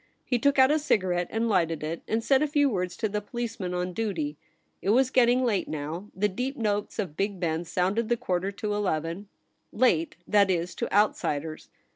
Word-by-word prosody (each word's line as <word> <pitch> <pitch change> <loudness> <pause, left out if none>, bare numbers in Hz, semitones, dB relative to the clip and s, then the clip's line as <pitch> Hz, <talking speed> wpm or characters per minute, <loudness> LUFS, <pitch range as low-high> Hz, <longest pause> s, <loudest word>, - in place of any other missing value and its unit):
He 245 - +1
took 280 +3 +2
out 265 +1 +6
a 310 - +3
cigarette 185 - +1
and 225 +1 0
lighted 165 -7 +1
it, 160 +2 -3
and 225 +1 0
said 270 +2 +3
a 305 - +2
few 290 0 +3
words 180 -3 -2
to 220 - 0
the 210 0 -2
police 235 +2 -5
man 180 -2 -3
on 180 0 -2
duty. 170 -9 -2 0.5
It - - -2
was 255 +4 +4
getting 250 0 +4
late 220 -6 +1
now 155 +6 -5
— - - -36
the 205 +3 +2
deep 250 +8 -3
notes 210 -3 -1
of 185 -9 -3
Big 195 +1 -2
Ben 165 -1 -1
sounded 195 +7 0
the 240 - +2
quarter 185 -1 -1
to 205 +1 -3
eleven 180 -1 -2 0.2
— - - -47
late, 190 -9 +2
that 200 -2 +4
is, 180 -1 0
to - - -4
outsiders. 160 -7 0
200 Hz, 210 wpm, -27 LUFS, 175-230 Hz, 0.5 s, out